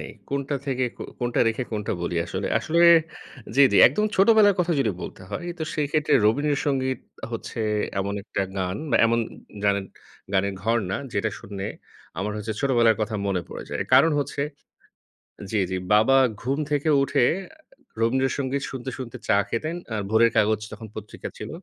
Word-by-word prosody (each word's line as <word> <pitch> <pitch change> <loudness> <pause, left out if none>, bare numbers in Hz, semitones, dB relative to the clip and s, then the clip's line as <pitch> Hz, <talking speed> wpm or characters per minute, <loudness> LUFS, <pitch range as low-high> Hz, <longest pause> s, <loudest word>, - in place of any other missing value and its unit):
নেই। - - -7 0.2
কোনটা 140 +1 -1
থেকে 130 -2 0
কো - - -7 0.2
কোনটা 120 -1 0
রেখে 115 +3 -2
কোনটা 105 -1 -2
বলি 85 0 -2
আসলে। 95 +3 -3
আসলে 170 +2 0 0.7
জি, 140 - +4
জি। - - +4
একদম 180 - +1
ছোটবেলার 205 0 +6
কথা 175 -1 +1
যদি 135 - +2
বলতে - - -8
হয়? 175 - -4
তো - - -3
সেই 150 -2 0
ক্ষেত্রে 150 -1 +2
'রবীন্দ্র 145 +7 +2
সঙ্গীত' 130 -2 0 0.3
হচ্ছে - - -5 0.4
এমন 100 +1 -2
একটা 100 - -2 0.2
গান 90 0 -2
বা 115 - +4
এমন 115 +1 +2 0.5
গানের 100 -1 +1 0.5
গানের 100 0 +1
ঘরনা, 110 -4 0 0.2
যেটা 110 +1 0
শুনে 100 -1 -6 0.5
আমার 105 +3 -2
হচ্ছে 105 +1 -3
ছোটবেলার 120 -5 +3
কথা 110 +1 -2
মনে 95 -3 0
পড়ে - - -7
যায়। - - -1
কারণ 165 - +7
হচ্ছে 140 0 -2 1.1
জি, 110 - 0
জি। 95 - -1 0.2
বাবা 110 +6 +5 0.3
ঘুম 135 +4 -1
থেকে 145 +2 +1
উঠে 135 - +2 0.8
'রবীন্দ্র 130 +4 +2
সঙ্গীত' 140 0 -2
শুনতে, 130 -1 -5
শুনতে 125 -3 -7
চা - - +4
খেতেন। 155 +10 -2 0.2
আর 105 - -1
'ভোরের 115 +2 +4
কাগজ' 110 0 +2
তখন 110 - -8
পত্রিকা 110 0 -7
ছিল, 105 - -7
115 Hz, 170 wpm, -24 LUFS, 105-140 Hz, 1.1 s, কারণ